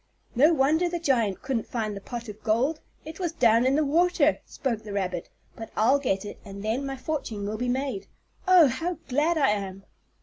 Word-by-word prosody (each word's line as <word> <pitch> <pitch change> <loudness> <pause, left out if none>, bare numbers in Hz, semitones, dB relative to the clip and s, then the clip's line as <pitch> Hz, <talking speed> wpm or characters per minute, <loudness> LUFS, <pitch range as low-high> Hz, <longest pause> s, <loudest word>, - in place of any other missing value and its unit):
"No 290 +7 +5
wonder 320 +4 +2
the 345 - -2
giant 240 - 0
couldn't 260 -4 -2
find 215 -3 -3
the 200 - -7
pot 235 +2 -7
of 210 0 -9
gold, 255 +8 +1 0.2
it 315 +3 -9
was 345 -3 -2
down 235 -4 +4
in 265 - +3
the 305 0 +2
water," 325 0 +3
spoke 235 -5 -3
the 210 -2 -8
rabbit. 185 -3 -3 0.3
"But 225 - -8
I'll 255 +6 +4
get 195 -8 -1
it, 205 - -8
and 200 -1 -9
then 245 +6 -1
my 270 0 -4
fortune 255 -8 -4
will 215 +1 -4
be 245 0 -1
made. 270 +8 -2 0.4
Oh, 365 -3 +8
how 325 +7 -2
glad 300 +6 +2
I 280 -3 +3
am!" 195 -2 -4
255 Hz, 205 wpm, -26 LUFS, 215-305 Hz, 0.4 s, Oh